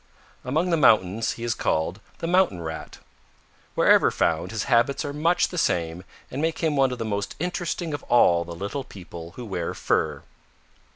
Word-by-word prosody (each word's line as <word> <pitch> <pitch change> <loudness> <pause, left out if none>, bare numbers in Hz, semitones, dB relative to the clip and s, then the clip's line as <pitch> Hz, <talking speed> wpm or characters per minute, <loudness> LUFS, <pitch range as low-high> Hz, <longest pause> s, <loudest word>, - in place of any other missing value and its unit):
Among 160 +8 0
the 165 - +3
mountains 110 - +3
he 115 - -8
is 120 -1 0
called 85 -1 -1 0.2
the - - -5
Mountain 175 - +2
Rat. 80 0 -6 0.8
Wherever - - +5
found, 80 0 0
his 110 -1 -2
habits 130 +3 +2
are 145 - -4
much 165 +4 +2
the 180 - -3
same 85 - -1 0.3
and 135 - -3
make 160 0 0
him 160 -3 0
one 135 -2 +3
of 125 - -4
the 115 - -3
most 100 -1 -3
interesting 175 -1 -2
of 145 - -3
all 85 -8 +4
the 85 0 -8
little 100 +10 -4
people 85 -6 -10
who 125 - -7
wear 90 -5 -3
fur. 75 -3 0
115 Hz, 180 wpm, -25 LUFS, -, 0.8 s, Wherever